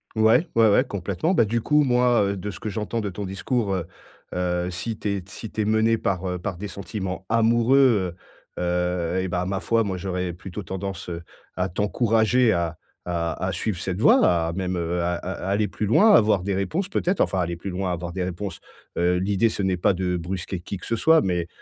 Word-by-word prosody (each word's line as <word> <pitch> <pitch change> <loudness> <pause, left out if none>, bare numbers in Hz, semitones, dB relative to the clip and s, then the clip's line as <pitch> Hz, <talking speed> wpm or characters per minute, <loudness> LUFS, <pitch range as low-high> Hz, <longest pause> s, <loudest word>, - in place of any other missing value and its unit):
Ouais, 110 +10 +4
ouais, 115 -2 +6
ouais, 115 +6 +5
complètement. 100 - -2
Bah, 115 - +4
du 115 +3 0
coup, 150 +3 +3
moi, 125 -3 +3
heu, 100 0 -1
de 105 +3 -4
ce - - -10
que 110 - -4
j'entends 110 +3 -3
de 100 - -2
ton 100 +3 -5
discours, 95 +3 -1
heu 90 -3 -2 0.5
heu, 90 0 -1
si 110 +5 -4
tu 105 - -2
es 100 -2 -2
si 105 +3 -8
tu 110 - -3
es - - 0
mené 110 +1 +3
par, 95 -2 -1
heu, 90 0 -2
par 90 -1 -4
des 105 +2 -5
sentiments 95 -2 -5
amoureux, 115 -3 +3 0.5
heu - - -2
heu 90 0 0
et 95 - -2
bah, 90 0 -1
ma 95 0 -1
foi, 115 +2 +1
moi, 95 -3 -3
j'aurais 90 -1 -3
plutôt 95 +3 -7
tendance, 95 0 -5
heu, 85 0 -5 0.3
à 90 +1 0
t'encourager 110 +4 +2
à 85 -1 -1 0.3
à 85 +1 -2
à - - 0
suivre 90 +3 -2
cette 95 +1 -3
voie, 240 - +6 0.2
à 85 - -3
même, 90 0 -2
heu, 85 +1 -1
à 90 +1 0
à 90 +2 -5
aller 105 +1 +1
plus 105 +2 -3
loin, 210 - +6
avoir 105 - +4
des 100 - -1
réponses 160 - -1
peut-être 185 -1 0
enfin, 95 - +1
aller 85 -1 -1
plus 95 +2 -5
loin, 90 0 -2
avoir 85 0 -4
des 95 0 -2
réponses. 90 +1 -5 0.4
Heu, 90 +1 +2
l'idée 100 +4 +2
ce 100 - -4
n'est 95 -1 +1
pas 95 +3 +3
de 90 0 -1
brusquer 90 +1 -4
qui 100 - -5
que - - -11
ce 115 - -1
soit, 160 +6 +5
mais 90 -2 -1
95 Hz, 225 wpm, -24 LUFS, 90-110 Hz, 0.5 s, ouais